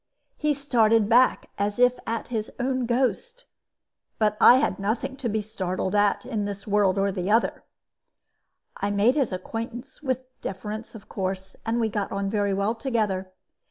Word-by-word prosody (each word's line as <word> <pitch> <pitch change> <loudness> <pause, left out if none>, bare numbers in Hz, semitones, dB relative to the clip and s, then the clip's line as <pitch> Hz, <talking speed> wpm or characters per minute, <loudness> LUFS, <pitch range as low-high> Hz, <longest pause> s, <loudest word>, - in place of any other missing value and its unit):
He 300 -1 0
started 230 -6 +3
back 245 +3 +3
as 205 0 0
if 250 0 +4
at 230 +1 -3
his 220 -3 -2
own 255 -1 0
ghost; 270 - -1 0.7
but 210 -1 +2
I 245 - +9
had 270 - 0
nothing 225 +7 -2
to 255 -4 -2
be 215 0 -1
startled 190 -3 -3
at, 205 +2 +2
in 220 -5 -2
this 200 -1 -6
world 200 -2 +2
or 195 0 +2
the 185 0 -3
other. 225 +2 +2 1.1
"I 200 - -1
made 205 +5 +3
his 275 -6 0
acquaintance, 230 +8 -6
with 260 -3 -1 0.2
deference, 215 +4 -6
of 210 - -11
course, 190 0 -4
and 230 +1 +1
we 225 - +2
got 205 -2 -3
on 195 0 -2
very 205 -2 +1
well 200 +3 +1
together. 215 -6 -1
220 Hz, 165 wpm, -25 LUFS, 200-245 Hz, 1.1 s, I